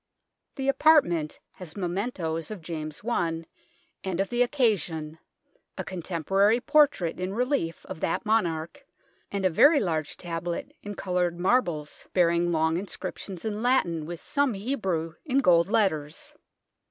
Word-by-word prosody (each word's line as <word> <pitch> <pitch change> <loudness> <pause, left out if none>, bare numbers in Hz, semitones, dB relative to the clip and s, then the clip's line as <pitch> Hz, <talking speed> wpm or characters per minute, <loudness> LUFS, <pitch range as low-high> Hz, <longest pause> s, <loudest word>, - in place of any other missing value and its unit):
The 270 0 -3
apartment 270 - +3 0.2
has 175 -4 -9
mementoes 175 -4 -2
of 210 -6 -7
James 155 -2 -5
I 165 -8 0 0.6
and 190 -2 -2
of 195 - 0
the 240 0 0
occasion 180 - 0 0.6
a - - -2
con 185 -2 -6
temporary 195 +7 +2
portrait 250 - +3
in 185 +2 -3
relief 250 - -1
of - - -7
that 165 - -1
monarch, 170 -7 0 0.5
and 200 -1 -1
a - - +5
very 290 - +6
large 160 - -2
tablet 170 0 -4
in 205 0 -6
coloured 180 -2 -1
marbles 175 -7 0
bearing 175 -1 +3
long 160 0 +2
inscriptions 190 -1 -6
in 215 -1 -2
Latin, 175 -11 +1
with 170 -1 -6
some 285 -5 0
Hebrew, 195 -8 -2
in 270 -4 0
gold 175 -10 +5
letters. 160 -8 0
180 Hz, 140 wpm, -27 LUFS, 165-220 Hz, 0.6 s, very